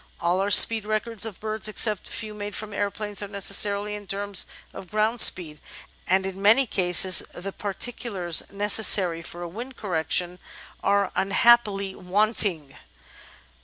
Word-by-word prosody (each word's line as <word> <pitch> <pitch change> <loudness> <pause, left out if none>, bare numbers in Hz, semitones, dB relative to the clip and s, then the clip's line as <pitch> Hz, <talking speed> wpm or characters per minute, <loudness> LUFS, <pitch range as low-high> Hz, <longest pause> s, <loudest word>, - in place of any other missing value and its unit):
All 175 +2 0
our 195 +1 -1
speed 220 +1 +6
records 215 +1 -2
of 210 - -10
birds, 215 0 -2
except 215 -1 -2
a - - -11
few 215 +2 -5
made 205 0 -7
from 215 -1 -8
aeroplanes, 205 0 -3
are 205 - -5
necessarily 200 +1 -1
in 205 -1 -9
terms 200 +1 -2 0.3
of 185 - -11
ground 215 +2 0
speed, 155 -5 +3 0.5
and 190 +1 +1
in 190 0 -7
many 225 +7 +5
cases 185 -3 +4 0.2
the 195 +3 -7
par 200 0 -6
ticulars 200 -9 -2
necessary 200 -4 +1
for 175 +1 -9
a - - -5
wind 240 +9 -9
correction 180 -1 -2 0.4
are 200 0 +1
unhappily 200 -1 +2
wanting. 190 -6 +1
200 Hz, 150 wpm, -24 LUFS, 185-215 Hz, 0.5 s, speed